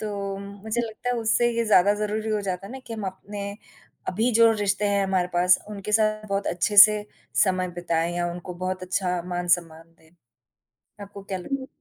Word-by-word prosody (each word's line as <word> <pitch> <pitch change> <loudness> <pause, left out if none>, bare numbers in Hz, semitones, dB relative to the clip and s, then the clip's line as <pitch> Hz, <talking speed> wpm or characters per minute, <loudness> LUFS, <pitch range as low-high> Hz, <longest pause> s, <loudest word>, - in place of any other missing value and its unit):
तो 200 -2 -4
मुझे 200 +3 -4
लगता 230 +1 -5
है 245 - 0
उससे 235 +2 +2
ये 235 - +1
ज़्यादा 205 -1 +5
ज़रूरी 215 +1 -2
हो 215 -1 0
जाता 190 -1 -4
है 220 - -10
ना 265 - -7
कि 230 - -7
हम 215 -2 -5
अपने 200 +1 -6 0.6
अभी 220 +6 +1
जो 230 0 +7
रिश्ते 205 -1 -1
हैं 200 -1 +1
हमारे 190 -2 +1
पास, 180 +1 +4
उनके 210 0 -6
साथ 215 0 +2
बहुत 200 0 -1
अच्छे 180 +4 -1
से 210 -1 -3 0.4
समय 185 -2 0
बिताएँ 170 0 -1
या 175 0 -1
उनको 180 +1 -8
बहुत 185 0 -3
अच्छा 180 -1 -1
मान-सम्मान 175 -2 -1
दें, 160 0 -24 0.9
आपको 200 0 -10
क्या 195 -1 -5
लग 265 +8 -4
200 Hz, 190 wpm, -25 LUFS, 180-215 Hz, 0.9 s, जो